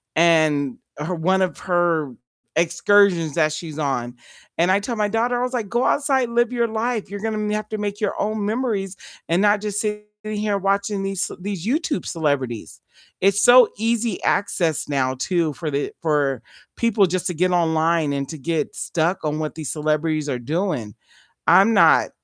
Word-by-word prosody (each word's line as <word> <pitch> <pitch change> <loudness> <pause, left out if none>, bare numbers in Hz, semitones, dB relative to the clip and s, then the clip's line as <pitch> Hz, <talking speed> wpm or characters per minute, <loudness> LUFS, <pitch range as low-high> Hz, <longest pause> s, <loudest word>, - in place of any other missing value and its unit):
and 155 -5 +3 0.2
her 160 +5 -3
one 185 +3 +1
of 185 - -3
her 170 -7 0 0.4
excursions 170 -1 +3
that 155 -2 +2
she's 155 -1 -7
on. 125 -5 -2 0.4
And 175 +3 +3
I 195 - +3
tell 235 +3 -4
my 210 -1 +1
daughter, 235 +3 0
I - - 0
was 250 +1 -3
like, 220 -5 -2
"Go 240 +2 +1
outside, 270 -4 +1
live 240 +1 +1
your 235 -1 +1
life, 225 -1 -2
you're 205 - -5
gonna 215 -1 -2
have 215 0 -4
to 215 - -3
make 205 0 -4
your 205 - -1
own 210 0 -1
memories 210 -5 -2 0.3
and 170 +3 +2
not 205 0 +3
just 210 -1 -3
sitting 210 -1 -2 0.2
here 210 -1 -1
watching 200 +1 -1
these 195 -1 -3
ce - - -4
these 195 0 -5
YouTube 300 +3 -1
celebrities." 135 - -2 0.4
It's 200 +2 +3
so 245 -2 +7
easy 230 -2 -1
access 170 -6 0
now 130 -2 0
too, 160 +3 -1
for 155 +1 -5
the 140 +1 -2
for 145 -6 0 0.3
people 220 -4 +2
just 180 0 -2
to 180 - -2
get 180 +3 +1
online 160 -3 +1
and 140 -1 -2
to 160 - -6
get 160 +3 -2
stuck 170 +2 -1
on 150 0 -1
what 155 0 -4
these 155 -4 -5
celebrities 155 0 -1
are 125 -3 -2
doing. 135 - -2 0.5
I'm 195 +6 +6
not 200 - +5
185 Hz, 180 wpm, -22 LUFS, 155-210 Hz, 0.5 s, so